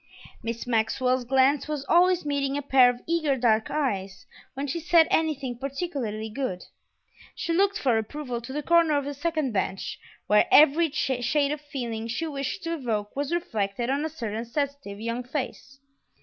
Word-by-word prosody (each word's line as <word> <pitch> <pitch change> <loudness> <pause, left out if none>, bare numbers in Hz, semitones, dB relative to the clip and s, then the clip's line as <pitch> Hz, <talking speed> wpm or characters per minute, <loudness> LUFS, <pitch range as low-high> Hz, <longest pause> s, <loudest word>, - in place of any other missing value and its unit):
Miss 230 0 -4
Maxwell's 250 +2 +1
glance 265 +3 +3
was 300 -2 -3
always 360 0 +4
meeting 280 -1 -1
a 290 - -3
pair 265 -2 +6
of 245 0 -4
eager 315 -5 +1
dark 225 -3 +2
eyes; 200 -10 -2 0.3
when 275 +2 -3
she 290 +4 -3
said 330 0 +5
anything 280 -6 0
particularly 270 -6 -3
good, 220 -5 -4 0.7
she 335 - -2
looked 395 +3 +2
for 255 - +2
approval 245 +1 -5
to 240 - -8
the 295 +2 -3
corner 335 -2 +4
of 285 - -2
the 285 - -3
second 310 -2 -1
bench, 190 -2 -2 0.3
where 210 0 +4
every 310 +3 +6
shade 275 0 0
of 300 -1 -3
feeling 235 -6 -5
she 245 +8 -2
wished 280 +4 -4
to 335 0 -2
evoke 225 -9 -3
was 285 +2 -2
reflected 235 - -1
on 280 +2 0
a 315 - -1
certain 225 -7 -4
sensitive 280 -4 -4
young 230 +2 -3
face. 270 +1 -5
275 Hz, 170 wpm, -26 LUFS, 235-300 Hz, 0.7 s, pair